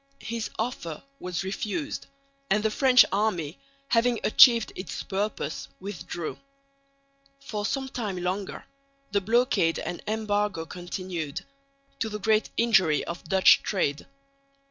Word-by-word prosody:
His 230 -1 -3
offer 215 -9 -4 0.2
was 180 0 -3
refused; 215 - -3 0.4
and 210 +1 +2
the 220 - +2
French 255 +1 +6
army, 185 -7 -1 0.3
having 235 0 +3
achieved 230 0 +6
its 185 - -5
purpose, 205 +2 -3
withdrew. 180 -4 -6 1.0
For 215 -6 -3
some 270 -1 -2
time 220 -8 -4
longer 190 +2 -3 0.5
the 200 0 +2
blockade 225 -5 +2
and 175 - -5
embargo 210 -5 -1
continued, 175 -3 -5 0.5
to 225 - -1
the 210 - -4
great 215 +1 +2
injury 190 -10 +4
of 170 +1 -6
Dutch 190 +3 +6
trade. 150 -8 -1
205 Hz, 120 wpm, -27 LUFS, 180-225 Hz, 1.0 s, French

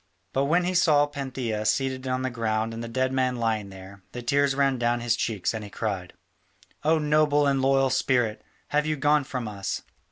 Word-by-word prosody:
But 135 +1 +1
when 170 +5 +2
he 180 +1 -1
saw 155 -5 +4
Pantheia 130 -6 -4
seated 130 +3 0
on 130 0 -1
the 130 - -1
ground 115 -1 -1
and 115 +1 -5
the - - -5
dead 130 +2 -1
man 130 -1 +1
lying 110 -4 -1
there, 95 0 -12
the 120 - -6
tears 140 +2 +2
ran 135 -2 +2
down 120 0 +1
his 120 -1 +1
cheeks 110 -4 -1
and 110 -1 -4
he 105 - -8
cried: 95 -3 -4 0.7
"O 160 +2 +3
noble 150 -1 +3
and 135 -1 +2
loyal 135 0 +3
spirit, 120 -5 +1 0.3
have 150 +1 +1
you 155 - +1
gone 145 +1 +3
from 125 -3 -4
us?" 100 -2 -4
130 Hz, 200 wpm, -26 LUFS, 115-140 Hz, 0.7 s, saw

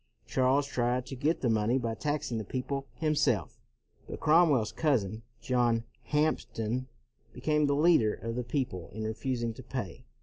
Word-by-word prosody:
Charles 135 +2 +2
tried 125 -2 0
to 135 - -7
get 150 +6 0
the 130 - +1
money 110 +3 +2
by 115 -3 -1
taxing 145 -3 -2
the - - -3
peo 125 +5 -3
ple 140 0 -3
himself, 150 - 0 0.5
but - - -6
Cromwell's 155 -8 +4
cousin, 115 - 0 0.2
John 120 -2 +2 0.2
Hampden, 130 -5 0 0.5
became 150 +3 +1
the 140 - +2
leader 150 -8 +4
of 115 0 -5
the 125 - -1
peo 130 +3 0
ple 90 -7 -9
in 110 +1 -4
refusing 115 +1 -2
to 120 - -10
pay. 120 -8 -6
125 Hz, 165 wpm, -30 LUFS, 115-145 Hz, 0.5 s, Cromwell's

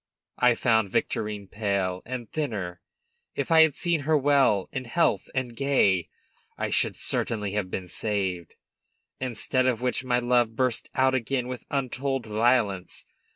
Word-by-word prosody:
I 125 -1 +5
found 110 -4 +2
Victorine 105 +1 -2
pale, 100 -3 -1
and 125 -2 -5
thinner; 100 - -3 0.5
if - - -3
I 160 0 +8
had 160 -3 +4
seen 170 -2 +1
her 155 +2 +2
well 135 -8 +3
in 130 -1 -4
health 165 +8 +1
and 125 -2 -2
gay, 105 -11 +2 0.5
I - - -2
should - - +2
certainly 105 -3 -1
have 100 -2 -2
been 90 -1 -4
saved. 95 -4 -1 0.6
Instead 130 +1 0
of 125 -1 0
which 125 0 0
my 125 -1 +1
love 120 -2 +2
burst 125 -1 0
out 130 0 +3
again 125 0 -1
with 125 -1 -6
untold 135 -1 -2
violence. 110 -3 +1
120 Hz, 150 wpm, -26 LUFS, 105-130 Hz, 0.6 s, I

